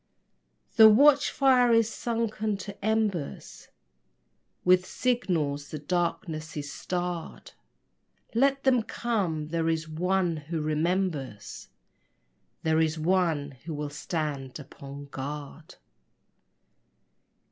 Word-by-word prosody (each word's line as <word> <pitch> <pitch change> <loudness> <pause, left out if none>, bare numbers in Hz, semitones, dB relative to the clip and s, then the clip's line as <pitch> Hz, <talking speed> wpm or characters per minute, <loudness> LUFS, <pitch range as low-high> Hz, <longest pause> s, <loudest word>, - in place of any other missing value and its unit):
The 220 -1 +10
watch 280 +6 +6
fire 255 -3 +4
is 230 -1 +4
sunken 220 -3 -2
to 200 0 -9
embers, 215 -8 -2 1.0
With 180 0 +5
signals 165 - -1
the 155 - -5
darkness 165 0 -2
is 145 -1 -5
starred. 175 -2 -4 0.8
Let 275 +3 +2
them 255 -3 +4
come! 190 -10 -2
There 165 0 0
is 160 0 -1
one 175 +1 0
who 160 +2 -4
remembers 155 - -2 1.0
There 160 0 +2
is 160 0 +1
one 160 -4 +1
who 165 -2 -4
will 145 0 -4
stand 145 -3 -4
upon 140 0 -10
guard. 145 +3 -7
170 Hz, 100 wpm, -27 LUFS, 150-215 Hz, 1.0 s, The